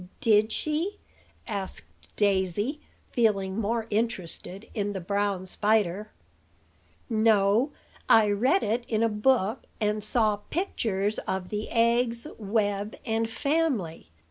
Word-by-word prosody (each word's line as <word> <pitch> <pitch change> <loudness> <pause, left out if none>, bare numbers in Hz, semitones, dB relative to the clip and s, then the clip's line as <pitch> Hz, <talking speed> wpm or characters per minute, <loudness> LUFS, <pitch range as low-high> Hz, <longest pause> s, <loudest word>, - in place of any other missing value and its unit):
Did 215 0 +4
she?" 325 - -1 0.5
asked 200 -4 -4 0.3
Daisy, 205 - +1 0.3
feeling 200 -4 +1
more 225 +1 -1
interested 205 -2 -2
in 205 -2 -2
the 190 - -3
brown 200 +1 -1
spider. 210 0 +1 1.0
"No; 220 +3 +3 0.4
I 215 -2 +6
read 255 - +2
it 230 +3 0
in 220 0 +1
a 230 - +3
book, 215 +1 +1
and 210 -1 0
saw 215 -1 +2
pictures 215 - -1
of 190 -1 -2
the 210 0 -4
eggs, 235 +1 +2
web, 205 -1 -1
and 225 0 0
family. 265 - -1
215 Hz, 115 wpm, -27 LUFS, 200-230 Hz, 1.0 s, I